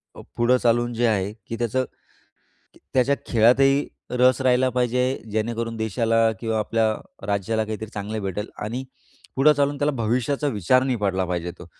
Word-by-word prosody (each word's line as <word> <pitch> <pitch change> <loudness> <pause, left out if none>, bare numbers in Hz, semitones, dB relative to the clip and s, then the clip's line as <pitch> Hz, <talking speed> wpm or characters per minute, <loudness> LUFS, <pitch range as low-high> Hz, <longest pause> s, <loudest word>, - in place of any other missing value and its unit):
अ, - - -10 0.2
पुढं 120 +2 +4
चालून 120 0 +1
जे 120 +1 +1
आहे 100 -1 0
की 115 - -4
त्याचं 120 +2 0 1.1
त्याच्या 130 +2 +3
खेळातही 135 +5 +4 0.2
रस 125 +1 +3
राहिला 130 0 +3
पाहिजे. 125 +1 0
जेणेकरून 115 +1 -2
देशाला 115 +1 +1
किंवा 110 -2 -1
आपल्या 110 +1 +1 0.4
राज्याला 105 +2 0
काहीतरी 110 0 -5
चांगले 105 +1 -4
भेटेल 100 +2 -4 0.2
आणि 125 +5 -4 0.5
पुढं 150 +3 +6
चालून 145 0 0
त्याला 145 +1 +1
भविष्याचा 125 +6 0
विचार 125 +3 +2
नाही 130 -2 0
पडला 95 -2 0
पाहिजे 90 -1 -3
तो. - - -11
115 Hz, 155 wpm, -23 LUFS, 110-130 Hz, 1.1 s, पुढं